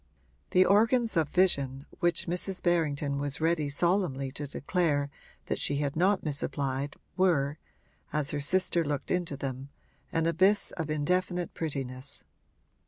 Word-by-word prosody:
The 185 Hz, +1 st, +5 dB
organs 225 Hz, +3 st, +3 dB
of 160 Hz, -3 st, +2 dB
vision 140 Hz, -7 st, +1 dB
which 175 Hz, -2 st, +1 dB
Mrs. 180 Hz, +2 st, 0 dB
Berrington 150 Hz, -5 st, +1 dB
was 145 Hz, 0 st, -1 dB
ready 160 Hz, -2 st, +1 dB
solemnly 140 Hz, -4 st, 0 dB
to 145 Hz, +1 st, -5 dB
declare 145 Hz, -1 st, 0 dB, 0.3 s
that -, -, -2 dB
she 145 Hz, -, +1 dB
had 145 Hz, +1 st, -1 dB
not 190 Hz, +4 st, +2 dB
misapplied 140 Hz, -1 st, -2 dB, 0.2 s
were, 155 Hz, -6 st, +2 dB, 0.5 s
as 150 Hz, -2 st, 0 dB
her 150 Hz, -, -2 dB
sister 175 Hz, +3 st, +2 dB
looked 145 Hz, -3 st, -3 dB
into 175 Hz, -6 st, -1 dB
them, 135 Hz, 0 st, -5 dB, 0.4 s
an 165 Hz, 0 st, +1 dB
abyss 185 Hz, +5 st, +3 dB
of 160 Hz, -3 st, -4 dB
indefinite 180 Hz, +4 st, 0 dB
prettiness. 135 Hz, -3 st, -5 dB
155 Hz, 135 wpm, -29 LUFS, 140-180 Hz, 0.5 s, The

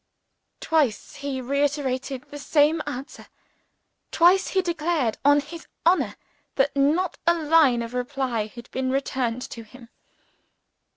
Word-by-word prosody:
Twice 295 Hz, -9 st, 0 dB
he 280 Hz, -2 st, -4 dB
reiterated 270 Hz, -1 st, -1 dB
the 290 Hz, -, -7 dB
same 300 Hz, +3 st, +2 dB
answer. 265 Hz, +5 st, -7 dB, 0.8 s
Twice 365 Hz, +3 st, +4 dB
he 380 Hz, -1 st, 0 dB
declared 330 Hz, -8 st, -1 dB
on 285 Hz, +1 st, +5 dB
his 325 Hz, +3 st, -11 dB, 0.2 s
honor 355 Hz, +3 st, +3 dB, 0.4 s
that 280 Hz, +1 st, +1 dB
not 310 Hz, +6 st, +1 dB
a 340 Hz, -, +5 dB
line 305 Hz, -7 st, +3 dB
of 230 Hz, +1 st, -8 dB
reply 250 Hz, -3 st, -2 dB
had 235 Hz, +2 st, -12 dB
been 260 Hz, 0 st, -2 dB
returned 255 Hz, -2 st, -1 dB
to 230 Hz, -, -7 dB
him. 235 Hz, +2 st, -15 dB
280 Hz, 125 wpm, -24 LUFS, 250-315 Hz, 0.8 s, on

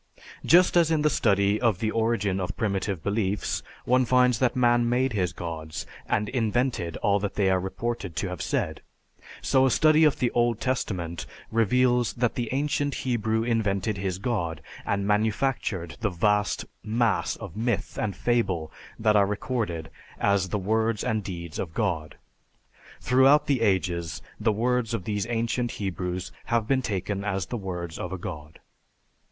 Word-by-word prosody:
Just 180 Hz, +2 st, +5 dB
as 170 Hz, -2 st, +5 dB
in 155 Hz, -2 st, +2 dB
the 150 Hz, -, +3 dB
study 100 Hz, -1 st, +2 dB
of 115 Hz, -6 st, +3 dB
the 110 Hz, +2 st, -1 dB
origin 110 Hz, -4 st, 0 dB
of 90 Hz, -2 st, -4 dB
primitive 100 Hz, -5 st, -1 dB
beliefs, 100 Hz, -1 st, -1 dB, 0.2 s
one 130 Hz, +1 st, +4 dB
finds 125 Hz, -1 st, +3 dB
that 125 Hz, -2 st, +2 dB
man 120 Hz, -1 st, +3 dB
made 125 Hz, +1 st, +1 dB
his 90 Hz, -5 st, 0 dB
gods 80 Hz, -2 st, -6 dB, 0.2 s
and 105 Hz, -, 0 dB
invented 115 Hz, -, 0 dB
all 100 Hz, 0 st, +3 dB
that 100 Hz, 0 st, -3 dB
they 95 Hz, -2 st, +2 dB
are 95 Hz, -, +3 dB
reported 95 Hz, -1 st, -4 dB
to 95 Hz, -, -1 dB
have 90 Hz, -3 st, -5 dB
said, -, -, -2 dB, 0.6 s
so 130 Hz, -1 st, +3 dB
a 135 Hz, -, +4 dB
study 155 Hz, +4 st, +5 dB
of 150 Hz, -2 st, +4 dB
the 120 Hz, -, +1 dB
Old 120 Hz, -2 st, +1 dB
Testament 90 Hz, -10 st, -2 dB, 0.2 s
reveals 120 Hz, +2 st, +2 dB
that 120 Hz, -1 st, 0 dB
the 120 Hz, -2 st, -3 dB
ancient 145 Hz, +1 st, 0 dB
Hebrew 110 Hz, -3 st, 0 dB
invented 110 Hz, -3 st, 0 dB
his 95 Hz, -2 st, -2 dB
God, 85 Hz, -8 st, -2 dB, 0.2 s
and 100 Hz, 0 st, 0 dB
manufactured 105 Hz, -, 0 dB
the 110 Hz, -, +1 dB
vast 105 Hz, +2 st, +1 dB, 0.2 s
mass 115 Hz, +2 st, +1 dB
of 100 Hz, -6 st, -9 dB
myth 115 Hz, -1 st, -2 dB
and 100 Hz, -4 st, -2 dB
fable 95 Hz, -9 st, 0 dB, 0.3 s
that 110 Hz, -1 st, +2 dB
are 100 Hz, -1 st, +5 dB
recorded 105 Hz, -6 st, -3 dB, 0.3 s
as 100 Hz, -2 st, +2 dB
the 105 Hz, -, -1 dB
words 110 Hz, +2 st, 0 dB
and 110 Hz, -4 st, 0 dB
deeds 85 Hz, -4 st, -6 dB
of 80 Hz, -3 st, -4 dB
God. 85 Hz, -9 st, -1 dB, 0.8 s
Throughout 135 Hz, +4 st, +5 dB
the 135 Hz, -5 st, +1 dB
ages, 90 Hz, -5 st, 0 dB, 0.2 s
the 110 Hz, +1 st, +2 dB
words 120 Hz, +1 st, 0 dB
of 95 Hz, -, -4 dB
these 105 Hz, +1 st, -2 dB
ancient 120 Hz, +1 st, -1 dB
Hebrews 90 Hz, -2 st, -3 dB
have 115 Hz, -2 st, 0 dB
been 135 Hz, +1 st, +2 dB
taken 100 Hz, -2 st, -2 dB
as 95 Hz, -2 st, -1 dB
the -, -, -5 dB
words 90 Hz, -5 st, -5 dB
of 90 Hz, -, -4 dB
a 95 Hz, -, -3 dB
god. 80 Hz, -3 st, -8 dB
105 Hz, 165 wpm, -26 LUFS, 95-120 Hz, 0.8 s, Just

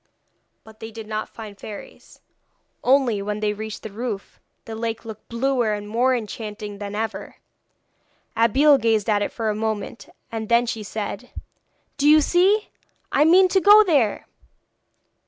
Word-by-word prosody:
But 220 Hz, 0 st, -17 dB
they 225 Hz, -, -7 dB
did 225 Hz, -1 st, -9 dB
not 215 Hz, 0 st, -4 dB
find 220 Hz, -2 st, -9 dB
any 200 Hz, -, -20 dB
fairies; 210 Hz, -2 st, -11 dB, 0.6 s
only, 255 Hz, -5 st, +3 dB
when 210 Hz, +1 st, -3 dB
they 210 Hz, -1 st, 0 dB
reached 215 Hz, +1 st, -7 dB
the 220 Hz, -, -7 dB
roof, 220 Hz, -2 st, -6 dB, 0.3 s
the 225 Hz, -, -7 dB
lake 225 Hz, 0 st, -4 dB
looked 220 Hz, -2 st, -10 dB
bluer 240 Hz, -2 st, 0 dB
and 205 Hz, 0 st, -5 dB
more 245 Hz, +4 st, +2 dB
enchanting 210 Hz, -2 st, -6 dB
than 205 Hz, 0 st, -6 dB
ever. 220 Hz, 0 st, -4 dB, 1.0 s
Abeille 270 Hz, +6 st, +4 dB
gazed 220 Hz, -2 st, +1 dB
at 210 Hz, -2 st, +2 dB
it 205 Hz, -, -2 dB
for 220 Hz, -2 st, -2 dB
a -, -, -3 dB
moment, 220 Hz, 0 st, -4 dB, 0.2 s
and 220 Hz, -1 st, -5 dB
then 235 Hz, +1 st, +4 dB
she 225 Hz, -2 st, -4 dB
said: 210 Hz, 0 st, -6 dB, 0.7 s
'Do 290 Hz, +1 st, +3 dB
you 310 Hz, +1 st, +8 dB
see? 380 Hz, +7 st, +2 dB, 0.4 s
I 295 Hz, -, +4 dB
mean 370 Hz, +4 st, +6 dB
to 380 Hz, +1 st, +2 dB
go 415 Hz, +2 st, +8 dB
there!' 285 Hz, -, +1 dB
225 Hz, 160 wpm, -22 LUFS, 210-260 Hz, 1.0 s, you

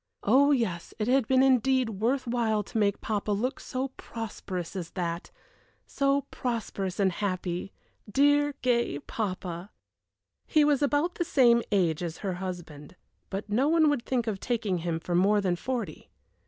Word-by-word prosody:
Oh 270 Hz, +7 st, +5 dB
yes, 190 Hz, -11 st, -1 dB
it 215 Hz, -, -1 dB
had 255 Hz, -2 st, +3 dB
been 260 Hz, 0 st, +4 dB
indeed 260 Hz, -1 st, +3 dB
worth 240 Hz, +7 st, 0 dB
while 230 Hz, -3 st, 0 dB
to 215 Hz, -, -6 dB
make 200 Hz, -1 st, +1 dB
papa 210 Hz, -1 st, -2 dB
look 235 Hz, +7 st, -1 dB
so 260 Hz, +1 st, -3 dB
prosperous 195 Hz, -6 st, -6 dB
as 175 Hz, -3 st, -4 dB
that 170 Hz, -2 st, -3 dB, 0.6 s
so 275 Hz, 0 st, +1 dB
prosperous 215 Hz, -6 st, -3 dB
and 195 Hz, -2 st, +3 dB
happy 185 Hz, -1 st, -3 dB, 0.4 s
dear, 290 Hz, +2 st, +3 dB
gay 235 Hz, -, +1 dB
papa! 185 Hz, +1 st, -4 dB, 0.8 s
He 305 Hz, -, +4 dB
was 290 Hz, -2 st, +3 dB
about 290 Hz, +5 st, +1 dB
the -, -, -1 dB
same 240 Hz, -7 st, +4 dB
age 175 Hz, -6 st, +2 dB
as 170 Hz, -1 st, -4 dB
her 190 Hz, -, 0 dB
husband, 175 Hz, -5 st, -7 dB, 0.3 s
but 200 Hz, +2 st, -4 dB
no 235 Hz, +7 st, +2 dB
one 315 Hz, -1 st, +4 dB
would 275 Hz, -5 st, -1 dB
think 250 Hz, -3 st, 0 dB
of 210 Hz, -4 st, -2 dB
taking 215 Hz, -7 st, -1 dB
him 165 Hz, -1 st, -2 dB
for 175 Hz, +1 st, -4 dB
more 200 Hz, +4 st, +4 dB
than 185 Hz, -3 st, +1 dB
forty. 225 Hz, -3 st, -4 dB
215 Hz, 160 wpm, -28 LUFS, 185-260 Hz, 0.8 s, Oh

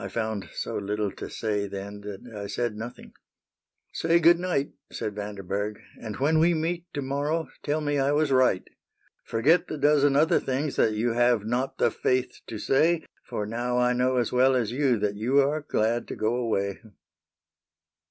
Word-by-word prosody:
I -, -, -3 dB
found 110 Hz, -3 st, -3 dB
so -, -, -4 dB
little 105 Hz, 0 st, -2 dB
to -, -, -8 dB
say 105 Hz, -2 st, -2 dB
then 100 Hz, +1 st, -7 dB
That 100 Hz, -1 st, -7 dB
I 100 Hz, -1 st, -5 dB
said 120 Hz, +1 st, -2 dB
nothing. 115 Hz, +3 st, -8 dB, 0.3 s
— -, -, -66 dB
'' -, -, -51 dB
Say 165 Hz, +1 st, +4 dB
good 170 Hz, +1 st, +6 dB
night. 175 Hz, -6 st, -1 dB, 0.2 s
Said 105 Hz, -, -4 dB
Vanderberg; 100 Hz, 0 st, -4 dB
" -, -, -21 dB
and 110 Hz, -2 st, -5 dB
when 155 Hz, +4 st, +2 dB
we 170 Hz, +2 st, +4 dB
meet 170 Hz, +2 st, -2 dB
To 145 Hz, -, -2 dB
morrow, 145 Hz, +3 st, -1 dB
tell 150 Hz, +1 st, -1 dB
me 145 Hz, -1 st, 0 dB
I 135 Hz, +1 st, +2 dB
was 150 Hz, -1 st, +2 dB
right. 130 Hz, -8 st, +3 dB, 0.2 s
»» -, -, -63 dB
>» -, -, -37 dB
'' -, -, -50 dB
Forget 150 Hz, +10 st, +3 dB
the 155 Hz, -, -4 dB
dozen 145 Hz, -1 st, +4 dB
other 155 Hz, +3 st, +4 dB
things 135 Hz, +2 st, -2 dB
That 110 Hz, -, +3 dB
you 115 Hz, +2 st, 0 dB
have 120 Hz, -3 st, +3 dB
not 125 Hz, +4 st, -1 dB
the -, -, +3 dB
faith 130 Hz, 0 st, -1 dB
to 110 Hz, -, -5 dB
say; 160 Hz, +9 st, +2 dB, 0.2 s
For 105 Hz, -, -3 dB
now 120 Hz, +3 st, -2 dB
I 125 Hz, 0 st, +3 dB
know 125 Hz, +1 st, +1 dB
as 120 Hz, -, +1 dB
well 130 Hz, +1 st, +4 dB
as 115 Hz, -4 st, 0 dB
you 130 Hz, -2 st, +2 dB
That 105 Hz, -1 st, -1 dB
you 125 Hz, +6 st, +2 dB
are 145 Hz, +3 st, +2 dB
glad 120 Hz, -4 st, 0 dB
to -, -, -5 dB
go 110 Hz, +2 st, 0 dB
away." 105 Hz, -5 st, -1 dB
125 Hz, 200 wpm, -26 LUFS, 105-145 Hz, 0.3 s, good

